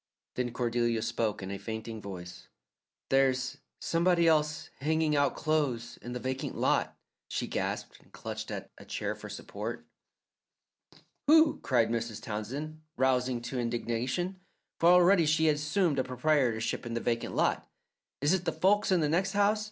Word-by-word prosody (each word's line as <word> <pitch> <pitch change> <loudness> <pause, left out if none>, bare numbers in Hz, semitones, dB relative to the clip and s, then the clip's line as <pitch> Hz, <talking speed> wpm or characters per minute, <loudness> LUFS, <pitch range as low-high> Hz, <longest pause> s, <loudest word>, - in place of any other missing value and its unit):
Then 125 -1 -2
Cordelia 120 -2 0
spoke 115 -3 -1
in 95 - -5
a 100 - -4
fainting 110 +2 -6
voice. 90 -3 -9 0.6
"There's 135 +1 +2 0.2
somebody 170 0 +2
else 150 -1 +1
hanging 155 +1 +1
out 145 -1 +2
clothes 145 -7 -1
in 120 - -6
the 125 - -3
vacant 130 +1 -3
lot," - - +1 0.3
she - - -2
gasped, - - -3
and - - -25
clutched - - -6
at - - -6
a - - -12
chair - - -3
for - - -10
support. - - -6 1.4
"Who?" 315 0 +6
cried 120 -4 +2
Mrs. 115 -2 -2
Townsend, 135 +8 -5 0.2
rousing 125 -2 +2
to 125 +1 -3
indignation, 120 +10 -2 0.4
for 170 - +5
already 180 -1 +6
she 160 +1 +3
had 150 -2 +4
assumed 150 0 +1
a - - +2
proprietorship 125 -3 0
in 115 - -4
the - - 0
vacant 115 0 -2
lot. - - +1 0.5
"Is 145 +5 +3
it 185 -2 0
the 165 - +1
folks 190 +6 +2
in 180 -3 +4
the 150 - +2
next 185 +6 +1
house? 205 +1 +3
135 Hz, 160 wpm, -30 LUFS, 115-160 Hz, 1.4 s, Who